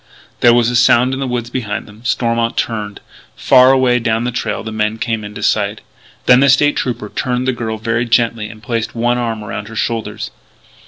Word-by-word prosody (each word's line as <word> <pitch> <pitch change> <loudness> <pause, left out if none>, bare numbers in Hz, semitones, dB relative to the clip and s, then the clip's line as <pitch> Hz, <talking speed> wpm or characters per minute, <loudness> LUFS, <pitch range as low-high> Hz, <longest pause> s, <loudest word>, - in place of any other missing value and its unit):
There 120 - +6
was 120 0 +2
a - - -2
sound 125 +1 +4
in 130 - -3
the 135 - -2
woods 120 -1 -3
behind 110 -4 -3
them. 105 +2 -16
Stormont 115 -1 0
turned. 105 -3 -3 0.3
Far 130 +1 +5
away 130 -2 +3
down 115 0 0
the 125 - -1
trail 125 - -3
the 110 - -6
men 110 0 -1
came 115 -1 -2
into 105 0 -8
sight. 105 0 0 0.4
Then 125 0 +6
the 140 +1 +4
State 145 +2 +4
Trooper 120 -4 -3
turned 125 +2 -2
the 130 - +2
girl 110 -2 -4
very 115 +2 -1
gently 115 -2 +1
and 110 0 -13
placed 115 -2 -3
one 120 +1 +1
arm 115 -3 -3
around 105 0 -6
her 115 - -10
shoulders. 115 0 -3
115 Hz, 205 wpm, -16 LUFS, 110-125 Hz, 0.4 s, There